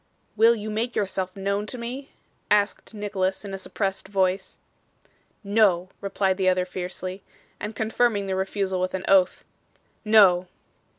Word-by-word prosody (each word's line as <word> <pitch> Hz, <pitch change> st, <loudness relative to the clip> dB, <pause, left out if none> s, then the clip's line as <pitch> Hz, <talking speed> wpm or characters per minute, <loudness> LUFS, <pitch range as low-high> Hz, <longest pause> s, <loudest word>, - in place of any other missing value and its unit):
'Will 225 Hz, +2 st, +6 dB
you 215 Hz, -1 st, -5 dB
make 230 Hz, +3 st, -2 dB
yourself 190 Hz, -2 st, -2 dB
known 200 Hz, +1 st, -2 dB
to 250 Hz, -, -6 dB
me?' 250 Hz, +4 st, -6 dB, 0.4 s
asked 205 Hz, +1 st, +1 dB
Nicholas 200 Hz, -2 st, -2 dB
in 195 Hz, -, -6 dB
a 195 Hz, -, -4 dB
suppressed 195 Hz, 0 st, -3 dB
voice. 190 Hz, -1 st, 0 dB, 0.9 s
'No,' 200 Hz, -4 st, +3 dB
replied 195 Hz, -1 st, 0 dB
the 190 Hz, -1 st, +3 dB
other 185 Hz, 0 st, +1 dB
fiercely, 185 Hz, +1 st, -5 dB, 0.4 s
and 210 Hz, +1 st, -5 dB
confirming 220 Hz, -2 st, +1 dB
the 190 Hz, -1 st, -2 dB
refusal 190 Hz, -1 st, -1 dB
with 185 Hz, +1 st, -1 dB
an 190 Hz, -, -4 dB
oath. 190 Hz, -2 st, +3 dB, 0.6 s
'No. 195 Hz, -5 st, +5 dB
195 Hz, 140 wpm, -25 LUFS, 185-215 Hz, 0.9 s, Will